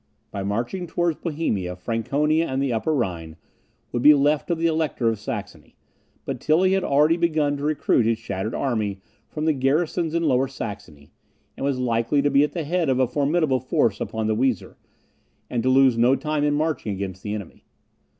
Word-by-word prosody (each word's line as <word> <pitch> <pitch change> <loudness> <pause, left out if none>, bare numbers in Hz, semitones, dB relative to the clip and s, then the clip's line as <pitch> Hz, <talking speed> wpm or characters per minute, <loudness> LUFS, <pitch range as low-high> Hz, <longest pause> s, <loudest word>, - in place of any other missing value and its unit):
By 100 - -4
marching 120 - -3
towards 170 -1 -1
Bohemia, 110 - -2
Franconia 140 - 0
and 130 0 -2
the 135 -3 0
Upper 110 +7 -1
Rhine 85 - -2 0.6
would 120 - -2
be 150 +3 +8
left 145 +1 +1
to 170 - 0
the 165 +1 -2
Elector 155 -7 +1
of 110 -2 -2
Saxony. 105 - -7 0.5
But - - -4
Tilly 185 +5 +3
had 195 -1 +1
already 150 +4 +3
begun 155 -4 +1
to 140 - -7
recruit 145 -6 +1
his 115 -1 +1
shattered 105 -1 -4
army 110 -7 -1 0.3
from 155 0 -4
the 160 - +3
garrisons 155 +4 0
in 170 - +1
Lower 135 -3 +2
Saxony, 100 - -8 0.4
and - - -7
was 140 -1 0
likely 120 +3 +1
to 145 - +2
be 140 +1 +5
at 150 - -1
the 170 - -3
head 165 0 0
of 130 - +2
a 130 - +3
formidable 145 +1 +1
force 115 -4 0
upon 110 -1 -3
the 110 0 +1
Weser, 125 -3 -1 0.8
and 120 - 0
to 130 - +1
lose 130 -2 +4
no 125 +3 +5
time 150 0 -2
in 145 0 +2
marching 150 -8 -1
against 95 -1 -5
the 105 0 -4
enemy. 100 -5 -9
135 Hz, 190 wpm, -23 LUFS, 110-155 Hz, 0.8 s, be